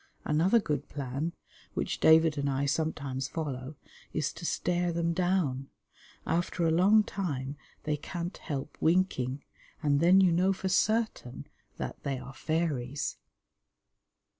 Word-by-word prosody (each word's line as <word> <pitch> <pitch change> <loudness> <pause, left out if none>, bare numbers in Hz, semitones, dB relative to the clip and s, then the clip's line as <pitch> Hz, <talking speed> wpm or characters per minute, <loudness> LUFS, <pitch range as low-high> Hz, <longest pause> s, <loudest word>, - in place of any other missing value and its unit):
Another 170 +10 +4
good 150 -8 -2
plan, 140 +4 -3 0.4
which - - -2
David 160 -1 +6
and 140 -1 -1
I 135 +1 0
sometimes 140 -3 -1
follow, 140 -2 -4 0.4
is 155 0 -1
to 170 - -5
stare 175 0 0
them 170 0 0
down. 165 -7 0 0.6
After 170 +1 0
a 165 - +3
long 200 +6 +5
time 145 -10 -3 0.3
they 150 -1 0
can't 175 +4 -5
help 140 0 -5
winking, 160 -7 +1 0.4
and 145 -1 +3
then 175 +4 +6
you 185 -2 +5
know 185 +3 +3
for 190 0 -3
certain 215 - 0 0.3
that - - -5
they 140 -2 -2
are 130 +1 -9
fairies. 145 -4 -2
160 Hz, 135 wpm, -30 LUFS, 140-175 Hz, 0.6 s, David